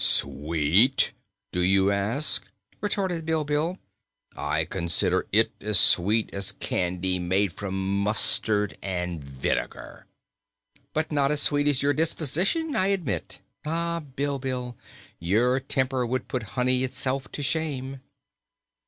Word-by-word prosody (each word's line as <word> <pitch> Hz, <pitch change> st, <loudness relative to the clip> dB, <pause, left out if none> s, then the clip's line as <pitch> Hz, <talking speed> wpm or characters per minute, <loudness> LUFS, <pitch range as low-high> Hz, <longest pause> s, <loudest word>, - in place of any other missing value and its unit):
"Sweet, 85 Hz, -, +3 dB, 0.4 s
do 90 Hz, -, -2 dB
you 95 Hz, +2 st, +4 dB
ask?" 100 Hz, +2 st, 0 dB, 0.3 s
retorted 190 Hz, -5 st, -1 dB
Bilbil. 155 Hz, +2 st, -1 dB, 0.6 s
"I 75 Hz, +2 st, -1 dB
consider 85 Hz, -1 st, 0 dB
it -, -, +4 dB
as 105 Hz, -3 st, +2 dB
sweet 105 Hz, +7 st, +4 dB
as 100 Hz, +1 st, -1 dB
candy 90 Hz, 0 st, -1 dB
made 95 Hz, +1 st, +1 dB
from 95 Hz, 0 st, -2 dB
mustard 105 Hz, 0 st, +2 dB
and 90 Hz, -4 st, -3 dB
vinegar." 70 Hz, -1 st, -4 dB, 0.9 s
"But 155 Hz, +1 st, -1 dB
not 140 Hz, -2 st, +2 dB
as 150 Hz, -1 st, +1 dB
sweet 145 Hz, 0 st, +3 dB
as 140 Hz, -2 st, +2 dB
your 145 Hz, +1 st, +3 dB
disposition, 170 Hz, -, 0 dB
I 185 Hz, -, +3 dB
admit. 195 Hz, -7 st, -2 dB, 0.2 s
Ah, 170 Hz, +2 st, -1 dB
Bilbil, 135 Hz, -3 st, -4 dB, 0.4 s
your 115 Hz, +9 st, +2 dB
temper 130 Hz, -1 st, -1 dB
would 125 Hz, +2 st, -2 dB
put 125 Hz, -2 st, -5 dB
honey 125 Hz, +1 st, +2 dB
itself 130 Hz, +1 st, -2 dB
to 145 Hz, -, -4 dB
shame." 135 Hz, -2 st, -2 dB
125 Hz, 120 wpm, -26 LUFS, 95-145 Hz, 0.9 s, you